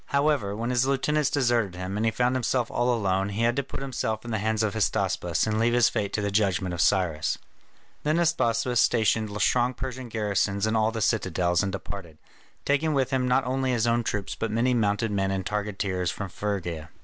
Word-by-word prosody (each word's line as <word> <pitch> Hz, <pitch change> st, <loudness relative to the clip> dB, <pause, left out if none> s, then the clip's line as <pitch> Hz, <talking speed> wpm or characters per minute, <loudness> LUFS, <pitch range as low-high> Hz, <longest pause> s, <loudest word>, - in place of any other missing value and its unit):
However, 140 Hz, -8 st, +1 dB
when 115 Hz, +3 st, -2 dB
his 125 Hz, +1 st, +2 dB
lieutenants 140 Hz, +2 st, +1 dB
deserted 120 Hz, -8 st, +1 dB
him 90 Hz, +2 st, -5 dB
and 105 Hz, -, -1 dB
he 115 Hz, -, +2 dB
found 125 Hz, +3 st, +1 dB
himself 125 Hz, -1 st, 0 dB
all 120 Hz, +1 st, +1 dB
alone, 100 Hz, -4 st, 0 dB
he 105 Hz, +3 st, -2 dB
had 120 Hz, +1 st, +2 dB
to -, -, +3 dB
put 135 Hz, 0 st, -7 dB
himself 110 Hz, -4 st, -3 dB
in 120 Hz, -, -5 dB
the 110 Hz, -, 0 dB
hands 110 Hz, +1 st, 0 dB
of 105 Hz, -, 0 dB
Hystaspas, 110 Hz, -2 st, 0 dB
and 110 Hz, 0 st, 0 dB
leave 120 Hz, +1 st, +2 dB
his 120 Hz, -1 st, +5 dB
fate 100 Hz, -1 st, -2 dB
to 105 Hz, -, 0 dB
the 100 Hz, -, -1 dB
judgment 95 Hz, -3 st, +1 dB
of 85 Hz, -, -1 dB
Cyrus. 85 Hz, -6 st, +1 dB, 0.6 s
Then 155 Hz, +2 st, +1 dB
Hystaspas 125 Hz, -8 st, +1 dB
stationed 110 Hz, -3 st, +2 dB
strong 125 Hz, +1 st, +2 dB
Persian 130 Hz, -1 st, -6 dB
garrisons 100 Hz, -2 st, 0 dB
in 110 Hz, +1 st, 0 dB
all 110 Hz, 0 st, +3 dB
the 110 Hz, -1 st, -4 dB
citadels, 90 Hz, -5 st, +1 dB
and 100 Hz, -1 st, -1 dB
departed, 95 Hz, -4 st, -7 dB, 0.5 s
taking 145 Hz, +2 st, +1 dB
with 135 Hz, -1 st, +1 dB
him 130 Hz, -1 st, +1 dB
not 125 Hz, +2 st, +2 dB
only 130 Hz, 0 st, 0 dB
his 120 Hz, -1 st, +1 dB
own 120 Hz, 0 st, +2 dB
troops 105 Hz, -3 st, -3 dB
but 115 Hz, -, -3 dB
many 115 Hz, +4 st, +1 dB
mounted 110 Hz, -1 st, +1 dB
men 95 Hz, -1 st, 0 dB
and 95 Hz, -1 st, -2 dB
targeteers 100 Hz, -3 st, -2 dB
from 100 Hz, -2 st, -5 dB
Phrygia. 90 Hz, -6 st, -4 dB
110 Hz, 210 wpm, -26 LUFS, 100-125 Hz, 0.6 s, his